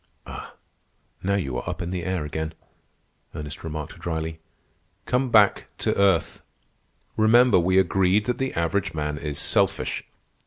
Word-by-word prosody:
"Ah, -, -, -9 dB, 0.7 s
now 100 Hz, +1 st, +1 dB
you 70 Hz, -10 st, -2 dB
are -, -, -5 dB
up -, -, -4 dB
in 90 Hz, -1 st, -3 dB
the 90 Hz, -2 st, -3 dB
air 90 Hz, -3 st, -2 dB
again," 80 Hz, +2 st, -4 dB, 0.8 s
Ernest 75 Hz, 0 st, -6 dB
remarked 75 Hz, -2 st, -6 dB
dryly. 80 Hz, -1 st, -3 dB, 0.7 s
"Come 130 Hz, +1 st, +1 dB
back 105 Hz, -3 st, +4 dB
to -, -, 0 dB
earth. 95 Hz, -4 st, +2 dB, 0.7 s
Remember, 115 Hz, 0 st, +5 dB
we 95 Hz, +2 st, +2 dB
agreed 95 Hz, +2 st, +3 dB
that 125 Hz, -, -1 dB
the 135 Hz, 0 st, -2 dB
average 85 Hz, 0 st, 0 dB
man 75 Hz, -1 st, -2 dB
is 75 Hz, -2 st, -4 dB
selfish." -, -, +1 dB
90 Hz, 145 wpm, -25 LUFS, 80-100 Hz, 0.8 s, Remember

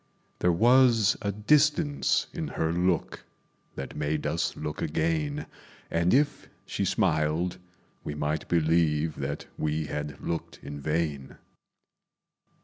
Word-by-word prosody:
There 90 Hz, -, +3 dB
was 120 Hz, +2 st, +5 dB
a 100 Hz, -2 st, -1 dB
distance 145 Hz, -, +2 dB
in -, -, -3 dB
her 80 Hz, 0 st, -1 dB
look 90 Hz, 0 st, 0 dB, 0.5 s
That 70 Hz, -, -6 dB
made 75 Hz, 0 st, -1 dB
us 75 Hz, +3 st, -1 dB
look 75 Hz, -1 st, -4 dB
again; 150 Hz, -, -1 dB, 0.5 s
And 85 Hz, +2 st, +2 dB
if 145 Hz, +3 st, +1 dB, 0.2 s
she -, -, -2 dB
smiled, 80 Hz, +4 st, +1 dB, 0.4 s
we 75 Hz, -, -4 dB
might 75 Hz, +1 st, -2 dB
believe 80 Hz, -2 st, +2 dB
That 70 Hz, +1 st, -4 dB
we 75 Hz, 0 st, -1 dB
had 75 Hz, 0 st, -5 dB
looked 85 Hz, -, -4 dB
in 70 Hz, 0 st, -7 dB
vain. 75 Hz, -3 st, -2 dB
85 Hz, 120 wpm, -28 LUFS, 75-105 Hz, 0.5 s, was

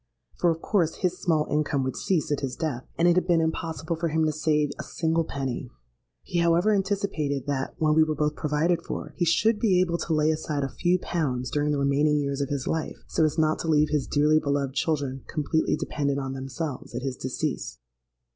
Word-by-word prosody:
For 175 Hz, -, +2 dB
of 165 Hz, 0 st, -2 dB
course 175 Hz, -7 st, +1 dB
his 180 Hz, 0 st, 0 dB
small 155 Hz, -3 st, +1 dB
income 150 Hz, -2 st, 0 dB
would 130 Hz, -1 st, -2 dB
cease 170 Hz, -6 st, 0 dB
at 145 Hz, -, +1 dB
his 135 Hz, -3 st, -3 dB
death; 140 Hz, -6 st, -3 dB
and 170 Hz, -, +4 dB
it 175 Hz, -, +5 dB
had 185 Hz, -, +1 dB
been 170 Hz, -2 st, +4 dB
impossible 160 Hz, 0 st, -2 dB
for 170 Hz, +1 st, -1 dB
him 160 Hz, 0 st, +1 dB
to 155 Hz, -, +2 dB
save 150 Hz, -1 st, +1 dB
a -, -, -3 dB
single 165 Hz, 0 st, 0 dB
penny. 135 Hz, -5 st, -4 dB, 0.5 s
He, 175 Hz, -, -2 dB
however, 170 Hz, +5 st, +3 dB
anticipated 190 Hz, -9 st, -1 dB
that, 140 Hz, -2 st, -2 dB
when 155 Hz, -1 st, +2 dB
we 160 Hz, -, +5 dB
were 155 Hz, -1 st, -1 dB
both 150 Hz, +1 st, 0 dB
provided 160 Hz, +3 st, +1 dB
for, -, -, -6 dB
he 175 Hz, -, +1 dB
should 210 Hz, +7 st, +3 dB
be 195 Hz, -6 st, +3 dB
able 170 Hz, -2 st, +1 dB
to 165 Hz, -, -1 dB
lay 155 Hz, +1 st, +3 dB
aside 155 Hz, -2 st, -2 dB
a 135 Hz, -, -1 dB
few 180 Hz, +4 st, +1 dB
pounds 130 Hz, -9 st, -2 dB
during 150 Hz, 0 st, +1 dB
the 145 Hz, -, +1 dB
remaining 140 Hz, +2 st, +2 dB
years 140 Hz, -1 st, -1 dB
of 140 Hz, -, -1 dB
his 140 Hz, -2 st, -2 dB
life, 160 Hz, -1 st, -2 dB
so -, -, 0 dB
as 155 Hz, 0 st, +1 dB
not 155 Hz, -1 st, +2 dB
to -, -, -4 dB
leave 150 Hz, -1 st, +3 dB
his 150 Hz, -3 st, 0 dB
dearly 150 Hz, +1 st, +3 dB
beloved 140 Hz, -2 st, -1 dB
children 140 Hz, -3 st, -1 dB
completely 160 Hz, 0 st, 0 dB
dependant 140 Hz, -2 st, -1 dB
on 135 Hz, -1 st, -3 dB
themselves 135 Hz, +2 st, -5 dB
at -, -, -3 dB
his 135 Hz, -2 st, -2 dB
decease. 60 Hz, -, -3 dB
155 Hz, 215 wpm, -26 LUFS, 140-165 Hz, 0.5 s, it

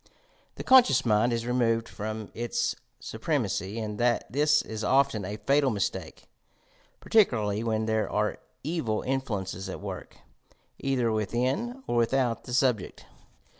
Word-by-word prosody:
The -, -, -6 dB
conscious 260 Hz, -, +6 dB
mind 110 Hz, +2 st, +3 dB
ia 115 Hz, 0 st, -1 dB
removed 115 Hz, -2 st, +1 dB
from 110 Hz, 0 st, -6 dB
its 120 Hz, 0 st, -1 dB, 0.2 s
supremacy, 95 Hz, +4 st, -2 dB
and 105 Hz, -2 st, -4 dB, 0.3 s
this 150 Hz, +3 st, +3 dB
is 110 Hz, 0 st, -6 dB
often 135 Hz, -4 st, +2 dB
a 105 Hz, +3 st, -5 dB
fatal 140 Hz, +3 st, +2 dB
mistake 100 Hz, -5 st, -3 dB, 0.4 s
— -, -, -35 dB
par -, -, -14 dB
ticularly 110 Hz, -, +3 dB
when 110 Hz, -1 st, 0 dB
there 110 Hz, -1 st, 0 dB
are 105 Hz, 0 st, 0 dB, 0.2 s
evil 140 Hz, -8 st, -1 dB
influences 105 Hz, -8 st, -3 dB
at -, -, -5 dB
work, -, -, -7 dB, 0.6 s
either 125 Hz, -4 st, 0 dB
within 130 Hz, -, -1 dB
or 120 Hz, -, -1 dB
without 120 Hz, 0 st, +1 dB
the 125 Hz, -, -6 dB
subject. 125 Hz, -7 st, 0 dB
115 Hz, 135 wpm, -28 LUFS, 110-135 Hz, 0.6 s, conscious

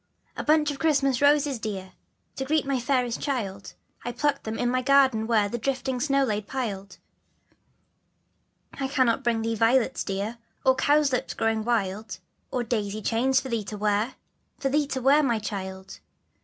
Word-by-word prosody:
/I -, -, -3 dB
BUNCH 300 Hz, -1 st, +3 dB
of 275 Hz, -, -7 dB
Christmas 275 Hz, -4 st, +2 dB
Roses, 285 Hz, -2 st, +3 dB
dear, 190 Hz, -4 st, -5 dB, 0.4 s
^^/jf -, -, -45 dB
To 270 Hz, -, -2 dB
S -, -, -14 dB
reet 310 Hz, -2 st, +2 dB
m 275 Hz, -, -2 dB
y 260 Hz, -, +1 dB
fairest 250 Hz, -2 st, 0 dB
child, 200 Hz, -9 st, -3 dB, 0.3 s
I 240 Hz, -, -3 dB
plucked 285 Hz, +4 st, -1 dB
them 220 Hz, 0 st, -3 dB
in 245 Hz, -, 0 dB
my 255 Hz, 0 st, +1 dB
garden 260 Hz, -4 st, +4 dB
where 215 Hz, -3 st, +3 dB
The 240 Hz, +4 st, -4 dB
drifting 260 Hz, +1 st, -2 dB
snow 275 Hz, +1 st, +2 dB
lay 210 Hz, -5 st, 0 dB
piled. 200 Hz, -4 st, -5 dB, 1.8 s
I 270 Hz, -1 st, -3 dB
cannot 260 Hz, -2 st, +1 dB
bring 230 Hz, -2 st, +1 dB
thee 225 Hz, 0 st, -1 dB
violets 230 Hz, +3 st, +2 dB
dear, 205 Hz, +4 st, -3 dB, 0.3 s
Or 260 Hz, -, +6 dB
cowslips 285 Hz, -3 st, +2 dB
growing 225 Hz, -1 st, 0 dB
wild, 215 Hz, -2 st, -1 dB, 0.3 s
Or 250 Hz, -, -1 dB
daisy 215 Hz, -3 st, -2 dB
chain 240 Hz, +5 st, +1 dB
for 265 Hz, 0 st, +2 dB
thee 230 Hz, -3 st, -1 dB
to 210 Hz, -, -6 dB
wear, 210 Hz, +4 st, 0 dB, 0.4 s
For 270 Hz, -, -1 dB
thee 290 Hz, +1 st, +1 dB
to 260 Hz, -3 st, -3 dB
wear, 280 Hz, +3 st, +5 dB
my 240 Hz, -6 st, +1 dB
child. 190 Hz, -3 st, -6 dB
245 Hz, 180 wpm, -26 LUFS, 215-275 Hz, 1.8 s, Or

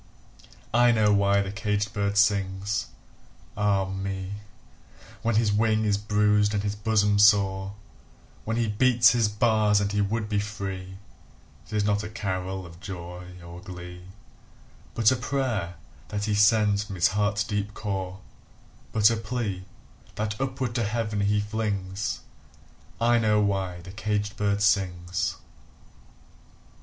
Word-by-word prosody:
I 120 Hz, +1 st, +5 dB
know 110 Hz, -3 st, +3 dB
why 100 Hz, 0 st, +3 dB
the 95 Hz, -, -5 dB
caged 105 Hz, -1 st, -2 dB
bird 100 Hz, -1 st, -1 dB
sings, 100 Hz, -1 st, +1 dB, 0.7 s
ah 100 Hz, -2 st, +1 dB
me, 95 Hz, 0 st, -4 dB, 0.9 s
When 115 Hz, -1 st, 0 dB
his 110 Hz, -1 st, +3 dB
wing 110 Hz, 0 st, +2 dB
is 100 Hz, -1 st, +1 dB
bruised 105 Hz, 0 st, +2 dB
and 100 Hz, -, -1 dB
his 105 Hz, -1 st, -1 dB
bosom 105 Hz, -1 st, +2 dB
sore, 100 Hz, -1 st, +4 dB, 0.7 s
When 110 Hz, +1 st, -2 dB
he 115 Hz, -1 st, +1 dB
beats 120 Hz, +2 st, +5 dB
his 115 Hz, -3 st, +2 dB
bars 105 Hz, -1 st, +3 dB
and 100 Hz, 0 st, -1 dB
he 105 Hz, 0 st, +1 dB
would 105 Hz, +2 st, -1 dB
be 105 Hz, -1 st, 0 dB
free; 95 Hz, -3 st, -5 dB, 0.7 s
It -, -, -12 dB
is 105 Hz, -1 st, +1 dB
not 105 Hz, 0 st, +1 dB
a 110 Hz, -, -6 dB
carol 95 Hz, -3 st, -4 dB
of 85 Hz, 0 st, -13 dB
joy 90 Hz, -1 st, -8 dB, 0.2 s
or 85 Hz, +1 st, -10 dB
glee, 90 Hz, -1 st, -9 dB, 0.9 s
But 115 Hz, 0 st, +4 dB
a -, -, +3 dB
prayer 125 Hz, -9 st, -2 dB, 0.3 s
that 105 Hz, 0 st, -3 dB
he 105 Hz, -, 0 dB
sends 105 Hz, 0 st, +4 dB
from 100 Hz, -2 st, -8 dB
his 90 Hz, -, +3 dB
heart's 105 Hz, +1 st, 0 dB
deep 105 Hz, 0 st, -3 dB
core, 95 Hz, -2 st, -4 dB, 0.7 s
But 110 Hz, 0 st, +5 dB
a 115 Hz, -, 0 dB
plea, 110 Hz, -6 st, -3 dB, 0.5 s
that 105 Hz, +3 st, -3 dB
upward 130 Hz, -3 st, -2 dB
to 115 Hz, -, 0 dB
Heaven 105 Hz, -1 st, -2 dB
he 105 Hz, +1 st, +2 dB
flings 105 Hz, -2 st, -3 dB, 0.8 s
I 120 Hz, 0 st, +4 dB
know 105 Hz, -1 st, +3 dB
why 95 Hz, -3 st, -1 dB
the 95 Hz, +2 st, -10 dB
caged 105 Hz, +1 st, -2 dB
bird 100 Hz, -1 st, 0 dB
sings! 90 Hz, -3 st, 0 dB
105 Hz, 145 wpm, -26 LUFS, 95-110 Hz, 0.9 s, I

